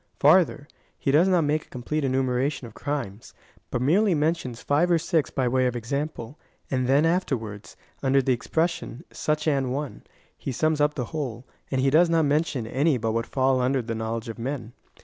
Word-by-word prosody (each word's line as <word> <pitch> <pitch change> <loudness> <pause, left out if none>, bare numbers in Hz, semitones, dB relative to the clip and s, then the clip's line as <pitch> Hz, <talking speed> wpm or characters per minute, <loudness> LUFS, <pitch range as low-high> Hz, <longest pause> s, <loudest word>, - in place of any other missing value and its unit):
Farther, - - +4 0.3
he 135 - 0
does 160 +6 +5
not 180 -3 +3
make 150 +1 0
a - - -32
complete 140 +5 -3
enumeration 130 +1 0
of 115 - -11
crimes, 125 -7 -5 0.3
but 125 - -1
merely 185 +7 +3
mentions 150 -6 -1
five 150 +5 +2
or 170 - +4
six 165 -2 0
by 130 -2 -1
way 130 +1 +2
of 125 - -2
example, 140 +2 -4 0.3
and 130 -2 0
then 140 +4 +4
afterwards, 120 - -2 0.2
under 135 0 +3
the 130 -1 +2
expression 160 +1 -2
such 150 0 -1
an 135 -4 +1
one, 140 +2 -4 0.3
he - - -5
sums 155 +4 +1
up 150 0 +2
the 125 - -2
whole; 130 -6 -4 0.2
and 130 -1 0
he 135 0 +2
does 165 +4 +5
not 165 -2 +3
mention 145 -4 0
any 135 +5 +1
but 115 -1 -1
what 115 +1 -1
fall 130 -1 +2
under 130 +2 +1
the 115 0 -4
knowledge 115 +1 -3
of 115 0 -7
men. 120 -2 -4
135 Hz, 190 wpm, -25 LUFS, 125-155 Hz, 0.3 s, does